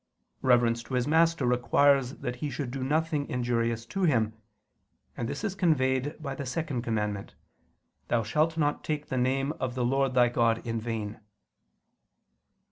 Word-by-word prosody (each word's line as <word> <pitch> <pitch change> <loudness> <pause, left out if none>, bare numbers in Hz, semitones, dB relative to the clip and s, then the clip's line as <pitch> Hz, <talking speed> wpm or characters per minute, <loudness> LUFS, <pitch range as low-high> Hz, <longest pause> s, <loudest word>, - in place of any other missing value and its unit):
Reverence 120 -2 +3
to 130 - -5
his 125 +1 +1
master 165 -2 +3
requires 125 +2 +3
that 125 - -4
he 150 +3 -3
should 130 -1 -4
do 135 0 -4
nothing 150 +1 0
injurious 115 -2 -1
to 195 - -1
him: 115 - +2 0.8
and 115 -1 -3
this - - -5
is 210 -4 -1
conveyed 145 -6 +1
by 140 -3 -4
the 140 - -5
second 135 -1 -2
commandment, 105 -3 -3 0.7
"Thou 115 -1 +1
shalt 155 +8 +1
not 145 -2 0
take 150 -1 -3
the 130 - -1
name 135 +3 +1
of 130 -1 -2
the 125 -2 0
Lord 135 +1 +1
thy 125 -1 +6
God 115 -1 +1
in 115 -1 -2
vain." 110 -2 -4
130 Hz, 160 wpm, -28 LUFS, 120-145 Hz, 0.8 s, thy